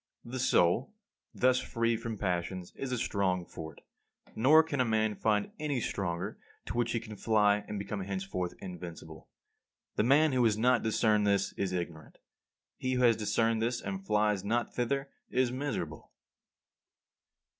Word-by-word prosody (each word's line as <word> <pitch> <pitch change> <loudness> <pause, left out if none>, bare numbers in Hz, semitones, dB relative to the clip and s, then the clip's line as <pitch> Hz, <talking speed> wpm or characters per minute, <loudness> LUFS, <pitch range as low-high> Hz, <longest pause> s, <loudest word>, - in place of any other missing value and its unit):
The 125 +2 -5
soul, 120 - +2 0.4
thus 125 0 +3
free 115 -2 0
from 115 -1 -5
passions, 90 -1 -2
is 135 -2 -4
a 125 - 0
strong 95 -5 0
fort; 80 -3 -9 0.5
nor 150 +8 +6
can 145 -4 -1
a - - +5
man 110 -2 +1
find 105 -1 0
any 150 -4 -1
stronger 90 -6 -3 0.3
to - - -5
which 120 0 +1
he 115 - +1
can 110 -2 -9
fly 105 -1 +3
and 105 - -4
become 100 +1 -4
henceforth 95 -2 -3
invincible. 85 -3 -9 0.7
The - - +3
man 145 +6 +5
who 130 -2 +2
has 110 -2 +3
not 125 +3 +3
discerned 110 -2 +2
this 100 -1 +1
is 95 -2 -2
ignorant. 85 -4 -5 0.6
He 130 0 -1
who 125 0 +1
has 115 -2 +6
discerned 110 +1 +1
and 125 - -2
flies 105 - +1
not 120 +4 -1
thither 135 +3 -1 0.2
is 125 -1 +1
miserable. 125 - -4
110 Hz, 155 wpm, -31 LUFS, 95-125 Hz, 0.7 s, nor